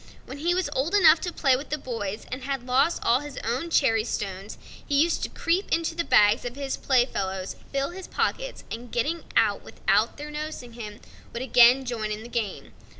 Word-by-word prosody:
When 270 +2 -9
he 345 +4 +1
was 370 -3 0
old 290 +9 0
enough 335 -5 +6
to 355 - -3
play 270 -6 +3
with 275 +4 -6
the 300 - -1
boys, 220 -6 -5
and 255 +1 -4
had 270 -2 -3
lost 270 +6 +2
all 235 +2 +4
his 290 -1 -9
own 250 +9 -2
cherry 225 -9 +3
stones, 195 -3 -5 0.3
he 285 -2 +1
used 330 +2 +2
to - - -2
creep 350 +4 -1
into 330 0 +1
the 335 +1 -1
bags 210 -6 +4
of 245 0 -5
his 275 -1 -3
play 255 -3 +3
fellows, 190 -5 -4 0.2
fill 275 +2 -1
his 375 +1 -8
pockets, - - -2
and, 235 +1 -7
getting 305 +8 -1
out - - +3
without - - 0
their 295 +1 -7
noticing 300 -5 -6
him, 215 -3 -8 0.3
would 235 - -4
again 250 +1 +6
join 225 -3 -3
in 210 +1 -4
the 235 - -10
game. 225 -5 -4
260 Hz, 210 wpm, -26 LUFS, 230-305 Hz, 0.3 s, enough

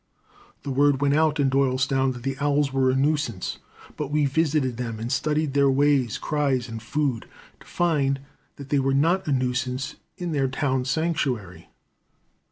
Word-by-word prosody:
The 140 - -4
word 140 0 +3
went 140 0 +2
out 155 0 +2
in 140 - +3
Doylestown 135 0 +1
that 120 -1 -10
the 135 0 -2
owls 145 -1 +1
were 135 -1 +2
a 130 - +2
nuisance. 135 - -1 0.4
But 150 -2 -3
we 150 0 +2
visited 140 -3 +1
them 115 -3 -4
and 115 +2 -4
studied 150 +1 0
their 140 -1 +4
ways, 135 -4 +2
cries, 140 -5 0
and 115 -1 -7
food, 135 -1 -2 0.3
to - - -18
find 145 -6 +1 0.4
that 140 -1 -10
they 145 - +2
were 135 0 +1
not 170 +6 +2
a - - 0
nuisance 130 +1 -1 0.2
in 175 -2 -4
their 140 -3 +1
town 130 -1 -1
sanctuary. 135 - -2
135 Hz, 170 wpm, -24 LUFS, 130-145 Hz, 0.4 s, their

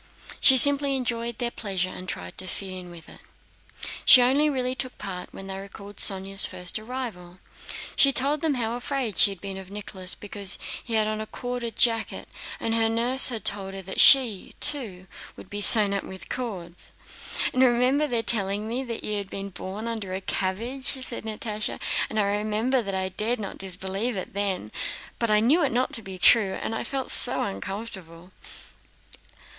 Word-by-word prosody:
She 265 - +6
simply 280 +1 +7
enjoyed 235 -2 -3
their 240 -1 -3
pleasure 190 -5 -3
and 185 0 -9
tried 90 0 -6
to 185 - +1
fit 190 +1 -5
in 185 -1 -7
with 170 -2 -13
it. - - -12 0.8
She 250 - +8
only 280 +5 +2
really 255 -3 -2
took 260 -1 -6
part 185 -2 -7
when 195 - -10
they 195 0 -7
recalled 200 +1 -12
Sónya's 195 0 +3
first 180 +2 -3
arrival. 215 -7 -8 0.6
She 275 - +4
told 280 +3 0
them 315 -4 0
how 230 -2 -2
afraid 245 -5 -4
she - - +7
had 195 -2 -8
been 195 +1 -7
of 190 -1 -10
Nicholas 195 -2 -4
because 200 -1 -1 0.3
he 230 - -4
had 215 -1 +2
on 215 0 -3
a 215 - -7
corded 245 -2 -6
jacket 230 -1 0 0.3
and 225 - -2
her 225 -1 +2
nurse 240 +4 +4
had 225 -5 -6
told 195 -1 +1
her 195 - -8
that 190 +1 -6
she, 245 -8 +5
too, 210 -11 +2 0.3
would - - -14
be 205 0 -4
sewn 205 -1 +9
up 200 - -2
with 190 0 -11
cords. 185 -9 -7 0.6
"And 255 - +1
I 260 - +6
remember 255 +5 +1
their 235 -4 -1
telling 205 -1 +1
me 245 +4 -3
that 230 -2 -6
you 210 -1 -2
had 200 -1 -8
been 195 0 -6
born 195 +5 -7
under 220 -4 -5
a 185 +1 -3
cabbage," 225 +9 -3 0.2
said 235 -3 -3
Natásha, 215 -1 -2 0.3
"and 215 - -3
I - - +2
remember 215 +5 -1
that 195 -3 -4
I 190 0 -2
dared 220 +6 -1
not 200 -2 -7
disbelieve 195 +4 -4
it 185 - -7
then, 195 - -3 0.5
but 230 - 0
knew 225 +10 +3
that 305 - +2
it - - -4
was 235 - -6 0.3
not 190 -2 -9
true, 200 -5 +5
and - - -5
I 225 - -4
felt 265 +1 -3
so 245 - +8
uncomfortable." 190 -4 -8
215 Hz, 190 wpm, -24 LUFS, 190-245 Hz, 0.8 s, sewn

